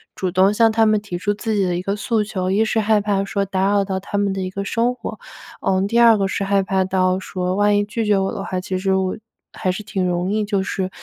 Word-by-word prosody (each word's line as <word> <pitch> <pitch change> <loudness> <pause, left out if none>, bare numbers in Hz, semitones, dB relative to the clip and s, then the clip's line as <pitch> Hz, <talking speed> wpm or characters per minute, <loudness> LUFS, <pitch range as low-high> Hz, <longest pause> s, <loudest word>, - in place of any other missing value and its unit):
主 185 - -2
动 190 +2 +3
向 225 +1 +4
他 225 0 +3
们 215 -1 +3
提 205 -4 -5
出 205 +3 -1
自 220 +1 -3
己 200 - +2
的 180 -2 0
一 - - -3
个 195 +2 -2
诉 220 +1 0
求。 185 -3 -3
1 205 +3 +3
是 220 - 0
害 215 0 +3
怕 200 -1 0
说 200 0 -1
打 190 0 0
扰 200 -1 +3
到 190 -1 -2
他 205 - -4
们 200 -1 +1
的 195 - -3
一 185 - -3
个 200 +1 -4
生 235 +4 +1
活， - - -7 0.4
嗯， 190 +1 +1
第 230 +3 0
2 230 -2 +7
个 195 -1 0
是 195 - -2
害 195 0 +2
怕 190 0 +1
到 185 0 +1
说 185 -1 -3
万 205 +1 +3
一 205 - +2
拒 220 +2 -3
绝 210 -1 +3
我 195 0 0
的 200 -3 -5
话， 185 - -3
其 185 0 -3
实 190 +1 0
我 190 -1 -1 0.4
还 185 - -1
是 180 - -5
挺 195 -3 -2
容 180 +1 -1
易 215 0 +1
就 200 -2 0
是， 190 -1 -3
195 Hz, 290 characters per minute, -20 LUFS, 190-210 Hz, 0.4 s, 2